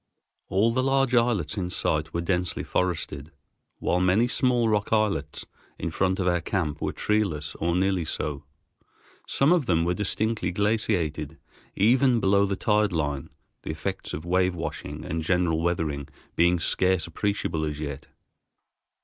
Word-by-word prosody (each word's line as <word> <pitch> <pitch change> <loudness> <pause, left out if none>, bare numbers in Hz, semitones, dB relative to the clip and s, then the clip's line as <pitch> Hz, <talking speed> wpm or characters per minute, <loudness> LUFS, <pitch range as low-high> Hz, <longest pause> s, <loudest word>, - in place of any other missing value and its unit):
All 100 +5 +2
the 130 - +2
large 135 -1 +2
islands 115 -8 +2
in 90 -2 -2
sight 75 -3 -1
were 85 - -2
densely 90 -1 -1
forested, 85 -4 -2 0.5
while 90 - 0
many 95 +6 +3
small 125 -2 +2
rock 105 -2 0
islets 100 -10 0 0.3
in 85 - -3
front 95 +3 0
of 95 - 0
our 90 -1 +2
camp 80 -4 -2
were - - -1
treeless 90 -9 -1
or 85 +1 0
nearly 95 -2 +1
so. 75 -2 -3 0.8
Some 140 +4 +3
of 175 -7 +3
them 85 -2 +2
were 90 - +1
distinctly 105 0 -1
glaciated 90 -7 0 0.4
even 120 +4 +4
belong 100 0 +3
the 100 - -1
tide 105 +1 +2
line, 75 -4 -2 0.3
the - - -8
effects - - -4
of 75 - -5
wave 90 +1 +2
washing 80 -2 -5
and 80 +1 -2
general 85 -1 +1
weathering 80 -4 -1 0.3
being 85 +1 +3
scarce 90 0 +1
appreciable 85 -2 -2
as 75 -1 -3
yet. 70 -3 -6
90 Hz, 150 wpm, -26 LUFS, 80-105 Hz, 0.8 s, even